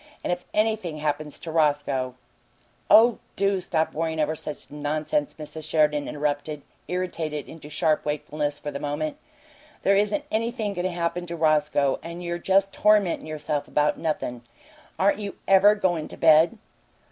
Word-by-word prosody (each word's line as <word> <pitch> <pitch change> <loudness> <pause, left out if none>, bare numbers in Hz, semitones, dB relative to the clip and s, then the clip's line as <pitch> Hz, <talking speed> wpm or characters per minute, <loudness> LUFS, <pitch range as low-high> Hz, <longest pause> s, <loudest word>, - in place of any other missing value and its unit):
And - - +1
if 175 - -6
anything 215 -7 0
happens 150 0 -2
to 165 - -7
Roscoe 145 -5 +1 0.4
" 120 - -38 0.3
"Oh, 230 +1 +7 0.2
do 195 0 +1
stop 160 -3 -1
worryin' 160 0 -2
over 155 +1 +1
such 150 -1 -7
nonsense," 155 - -1
Mrs. 155 0 -7
Sheridan 150 -2 +2
interrupted, 145 0 -2 0.2
irritated 165 -5 -3
into 155 -2 -11
sharp 155 +1 +1
wakefulness 150 0 -2
for 145 - -5
the 140 - -5
moment. 150 +1 -3 0.7
"There 195 - +4
isn't 210 +9 +1
anything 225 -1 -1
goin' 180 -1 -3
to 185 - 0
happen 175 +1 -2
to 170 - -4
Roscoe, 150 -3 +2
and 170 +1 -7
you're 170 0 -3
just 195 +2 +2
tormentin' 210 -6 +3
yourself 150 -1 -3
about 150 0 +1
nothin'. 150 -6 -2 0.6
Aren't 200 +2 +2
you 200 -1 -5
EVER 195 +2 +6
goin' 175 -6 0
to - - -10
bed?" 165 +6 +5
160 Hz, 160 wpm, -25 LUFS, 150-190 Hz, 0.7 s, Oh